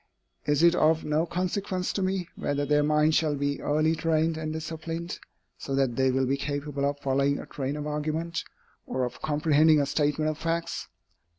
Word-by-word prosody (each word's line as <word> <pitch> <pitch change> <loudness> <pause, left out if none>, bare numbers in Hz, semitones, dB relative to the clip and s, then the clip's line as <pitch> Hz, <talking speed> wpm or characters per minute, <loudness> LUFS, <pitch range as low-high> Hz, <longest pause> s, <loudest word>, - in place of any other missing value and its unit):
Is 145 +2 +3
it 170 0 +7
of 160 -1 +3
no 155 +3 +1
consequence 185 +1 -2
to 200 - -1
me, 185 -2 -1
whether 145 0 -1
their 150 +1 +3
minds 150 +1 +3
shall 155 -2 +2
be 140 0 -2
early 155 +2 +2
trained 160 0 +1
and 155 -1 -3
disciplined, 165 +2 -5 0.4
so 135 - -3
that 135 -3 +1
they 130 0 +3
will 130 +1 +1
be 135 +2 0
capable 145 0 -2
of 145 - -4
following 140 +1 +1
a - - -7
train 140 +1 -4
of 150 - -4
argument, 155 +3 -2 0.4
or 130 - -1
of 125 0 -4
comprehending 155 0 +4
a 140 - +2
statement 150 +2 +1
of 155 - -8
facts? 165 +1 -2
150 Hz, 185 wpm, -27 LUFS, 145-165 Hz, 0.4 s, it